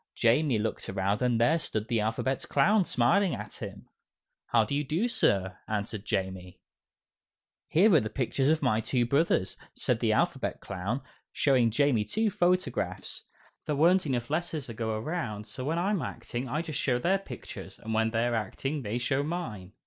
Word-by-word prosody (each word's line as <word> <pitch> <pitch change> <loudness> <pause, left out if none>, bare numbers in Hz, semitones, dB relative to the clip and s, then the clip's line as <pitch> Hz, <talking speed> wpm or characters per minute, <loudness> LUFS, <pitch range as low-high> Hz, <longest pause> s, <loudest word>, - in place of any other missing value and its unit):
Jamie 125 +2 +3
looked 110 +1 -3
around 95 +3 0
and 125 -2 +2
there 125 +8 +4
stood 110 -7 -3
the 115 -2 +1
Alphabet 115 +5 -1
Clown 195 +9 +4
smiling 165 +11 +2
at - - -7
him. - - -7 0.6
"How 115 -2 +3
do 110 - -4
you 145 +1 +1
do, 165 - 0
Sir!" 95 - +1
answered 105 0 -3
Jamie. 95 -1 -3 1.1
"Here 195 +6 +5
are 160 - +7
the 110 -3 -3
pictures 135 +3 0
of 155 -1 +2
my 115 -4 +2
two 120 +1 +1
brothers," 140 - +1 0.2
said - - 0
the - - +2
Alphabet - - 0
Clown, 100 +9 -3 0.3
showing 130 -5 +3
Jamie 120 -1 +2
two 215 - 0
photographs; 175 - -1 0.4
"there 150 - 0
weren't 170 +4 +4
enough 125 -1 -2
letters 160 -3 -2
to 115 - -7
go 110 0 -2
around, 110 -6 -3
so 125 +5 -7
when 155 +5 -1
I'm 190 +1 +1
acting, 125 -2 -5
I 150 +6 -1
just 155 -3 -4
show 125 -3 +2
their 190 +10 +2
pictures, 195 - -9
and 110 - -5
when 110 0 +2
they 115 +1 +1
are 120 - 0
acting, 135 +7 -2
they 110 0 -2
show 135 +3 0
mine." 130 - -5
125 Hz, 180 wpm, -29 LUFS, 110-155 Hz, 1.1 s, are